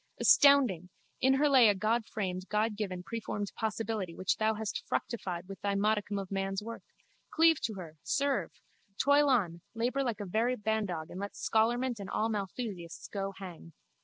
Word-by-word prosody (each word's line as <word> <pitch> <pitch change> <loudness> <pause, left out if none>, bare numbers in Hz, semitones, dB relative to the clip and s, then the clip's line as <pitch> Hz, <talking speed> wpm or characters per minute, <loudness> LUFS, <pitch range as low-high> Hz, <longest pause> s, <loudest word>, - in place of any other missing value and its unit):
Astounding! 255 - +5 0.3
In 265 +1 +5
her 295 +2 +3
lay 260 -6 +7
a 205 - +3
Godframed 205 -3 -1
Godgiven 210 -4 -1
preformed 210 -2 -4
possibility 220 -5 -2
which 185 - 0
thou 220 0 +1
hast 215 -1 -4
fructified 180 -6 -3
with 195 -2 -9
thy 200 -1 0
modicum 210 0 +1
of 195 -1 -5
man's 195 +1 -2
work. 230 +1 -7 0.5
Cleave 325 -1 +4
to 220 -2 -2
her! 165 -4 -9
Serve! 280 0 0 0.5
Toil 285 +1 +4
on, 180 -10 +1
labour 245 +4 0
like 235 -6 -2
a 205 - -4
very 225 +7 +1
bandog 205 -7 -2
and 180 - -7
let 200 0 -5
scholarment 240 +2 +1
and 195 -1 -6
all 220 - 0
Malthusiasts 200 -4 -5
go 195 -1 -3
hang. 175 -4 -10
210 Hz, 160 wpm, -31 LUFS, 190-235 Hz, 0.5 s, lay